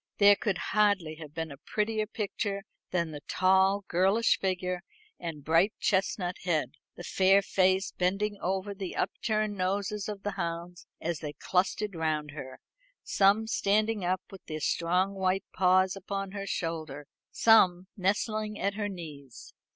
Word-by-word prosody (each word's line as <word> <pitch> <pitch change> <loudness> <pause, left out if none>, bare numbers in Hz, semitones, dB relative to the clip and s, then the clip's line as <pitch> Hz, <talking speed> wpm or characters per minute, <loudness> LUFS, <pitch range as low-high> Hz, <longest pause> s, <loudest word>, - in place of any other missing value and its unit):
There 205 0 +7
could 200 -3 -1 0.2
hardly 200 -7 +2
have 155 -2 -10
been 160 -2 -3
a 140 - -9
prettier 215 0 -1
picture 205 -2 -3 0.3
than 170 -3 -1
the 145 -1 -7
tall 190 +2 +3
girlish 195 +6 +3
figure 180 -1 -1 0.4
and 160 -4 -6
bright 165 +7 +3
chestnut 190 -2 0
head, 155 -8 0 0.2
the 175 - -9
fair 195 +2 +4
face 190 0 +2
bending 195 +3 0
over 190 +2 -1
the 195 -2 -6
upturned 215 -1 -1
noses 200 +2 -1
of 205 -1 -6
the 205 - -1
hounds 175 -2 -5
as 170 -1 -2
they 150 -2 -5
clustered 190 +6 0
round 155 -3 -1
her, 135 -3 -8 0.5
some 200 +3 +3
standing 215 -1 +1
up 180 +1 0
with 195 - -11
their 155 0 -4
strong 180 +5 +1
white 190 0 0
paws 185 0 +3
upon 195 0 -4
her 200 0 -5
shoulder, 155 -5 -3 0.2
some 185 -5 +5
nestling 210 +2 -1
at 200 -1 0
her 205 0 -2
knees. 150 -9 -10
190 Hz, 150 wpm, -29 LUFS, 170-205 Hz, 0.5 s, There